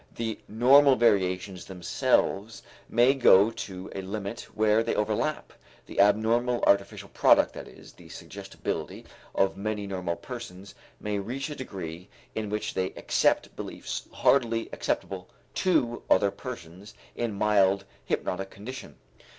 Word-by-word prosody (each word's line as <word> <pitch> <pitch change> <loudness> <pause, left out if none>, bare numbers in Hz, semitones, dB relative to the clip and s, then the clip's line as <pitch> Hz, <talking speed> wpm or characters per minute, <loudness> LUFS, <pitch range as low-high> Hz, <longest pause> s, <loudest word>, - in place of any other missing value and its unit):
The 115 -2 -3
normal 130 +5 +6
variations 95 -5 +1
themselves 95 +3 0 0.3
may 120 +3 +5
go 110 -5 +6
to 95 -4 -7
a 95 - -4
limit 100 +3 -5
where 110 0 +3
they 115 - -1
overlap 110 +8 -1 0.3
the - - -7
abnormal 115 +4 +3
artificial 100 0 +1
product, - - +4
that - - -8
is, - - -15
the - - -16
suggestibility - - -6 0.3
of 95 0 +2
many 105 0 -3
normal 90 -3 -3
persons 100 -6 -9 0.3
may 105 -1 -2
reach 130 +9 -4
a - - -5
degree 90 - -7 0.2
in 110 -1 -3
which 105 +1 -3
they 95 0 -2
accept - - +1
beliefs - - -6
hardly 115 -4 +2
acceptable 95 -2 -3 0.2
to 120 -11 +1
other 100 +1 +4
persons 100 -4 -9 0.2
in 115 -3 -2
mild 100 -1 +3 0.2
hypnotic 95 +1 -2
condition. 120 +8 -9
105 Hz, 130 wpm, -27 LUFS, 95-120 Hz, 0.3 s, normal